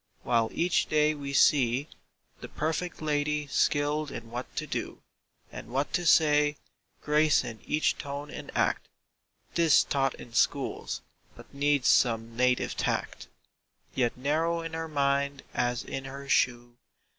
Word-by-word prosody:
While 115 -2 +2
each 175 +2 +1
day 155 0 +3
we 140 -2 -6
see 135 -1 +3 0.5
The - - -9
"perfect 160 +2 -3
lady" 150 0 0
skilled 145 +1 +1
in 115 -3 -8
what 125 +2 -6
to - - -2
do - - -5 0.5
And - - -8
what 135 +4 -2
to 175 -1 0
say, 150 -2 +4 0.5
grace 150 0 +3
in 110 -2 -7
each 155 - +1
tone 145 +1 -6
and - - -8
act - - +1 0.7
('Tis 165 -3 +5
taught 135 -2 0
in 115 - -12
schools, - - 0 0.3
but - - -15
needs 145 -1 +1
some 115 -2 +2
native 125 +1 +1
tact), - - -2 0.7
Yet 120 -2 0
narrow 160 +5 0
in 165 0 -6
her 165 0 -3
mind 140 -1 0
as 120 0 -1
in 135 - -6
her 140 +1 -8
shoe. 120 -2 +1
140 Hz, 145 wpm, -28 LUFS, 125-150 Hz, 0.7 s, Tis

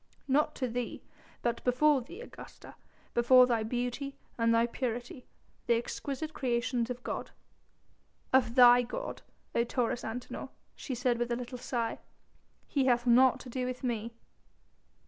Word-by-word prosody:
"Not 300 +3 +2
to 255 - -1
thee, 240 0 -4 0.4
but 235 -1 -1
before 270 +3 +3
thee, 270 - -10
Augusta; - - -12 0.4
before 250 +1 +7
thy 235 -3 +1
beauty 245 +4 -3 0.2
and 230 -1 +2
thy 230 0 +4
purity, 245 +1 -4 0.4
the 235 - +4
exquisite 280 +6 -4
creations 240 -1 -1
of 250 0 -5
God." - - -4 1.0
"Of 245 -3 +3
thy 245 -1 +8
God, 375 - -5 0.3
O 235 - +2
Taurus 240 0 -1
Antinor," 245 +3 -6 0.3
she 260 - -5
said 245 -1 0
with 240 0 -1
a - - +2
little 250 +1 -6
sigh. 235 -2 -2 0.7
"He 275 -3 +1
hath 240 -1 +2
naught 250 +1 +5
to 255 - -10
do 255 +1 -2
with 255 +1 -5
me." 235 -2 -2
245 Hz, 145 wpm, -31 LUFS, 235-260 Hz, 1.0 s, thy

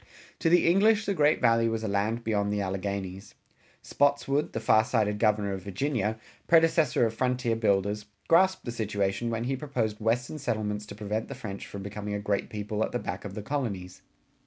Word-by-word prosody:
To 165 - +2
the 175 +1 +5
English 210 +4 +4
the 200 - 0
great 150 -3 +3
Valley 115 -1 +3
was 115 0 -2
a - - -1
land 105 +4 0
beyond 105 -2 0
the 105 - 0
Alleghanies. 95 0 -4 0.5
Spotswood, 145 0 +1
the - - -2
far 110 0 +4
sighted 105 -3 0
Governor 105 -2 +2
of 95 - -5
Virginia, 110 +2 -1 0.3
predecessor 160 -6 +4
of 115 - -1
frontier 125 -1 0
builders, 100 -1 0 0.2
grasped 190 +3 +4
the 120 - -3
situation 105 -1 -1
when 115 0 -2
he 135 +2 -1
proposed 120 -7 -2
western 120 +7 -1
settlements 105 -5 -2
to 100 - -8
prevent 105 +1 -3
the 140 - -7
French 110 -6 -7
from 100 -1 -7
becoming 105 +1 -5
a - - -2
great 100 -1 -1
people 105 0 -2
at - - -2
the - - +1
back 95 -5 -5
of 100 -1 -7
the 105 - -5
colonies. 100 -10 -4
110 Hz, 190 wpm, -28 LUFS, 100-125 Hz, 0.5 s, the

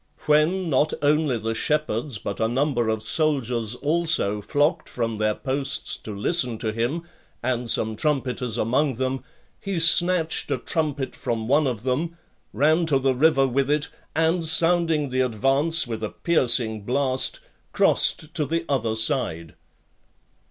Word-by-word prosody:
When, 155 +5 +2
not 150 +1 +1
only 145 -3 +2
the 115 +1 -3
shepherds, 145 -1 -1
but 100 -1 -6
a 110 - +1
number 120 -1 0
of 110 0 -2
soldiers 125 -5 0
also 150 -8 0
flocked 150 - 0
from 115 -2 -3
their 110 0 0
posts 135 0 -2
to 105 -2 -8
listen 125 - 0
to 110 0 -3
him, 120 +9 -2 0.4
and 125 -1 -1
some 110 -1 0
trumpeters 125 -3 -2
among 130 +4 0
them, 130 +1 -3 0.4
he 195 -2 -4
snatched 165 0 +4
a - - 0
trumpet 150 -5 -3
from 115 -2 -4
one 145 +3 +3
of 115 -4 -4
them, 155 +7 -2 0.3
ran 160 +4 +2
to 145 -4 +3
the 135 0 +1
river 135 0 +3
with 135 +2 0
it, 150 0 0 0.3
and 165 +1 +1
sounding 165 -2 +2
the 130 0 +1
advance 135 +7 +2
with 115 -2 -5
a 110 - -3
piercing 120 -9 +1
blast, 130 +4 0 0.3
crossed 155 +1 +2
to 150 -4 -1
the 165 +1 -2
other 115 -5 -1
side. 110 - 0
135 Hz, 150 wpm, -23 LUFS, 115-155 Hz, 0.4 s, snatched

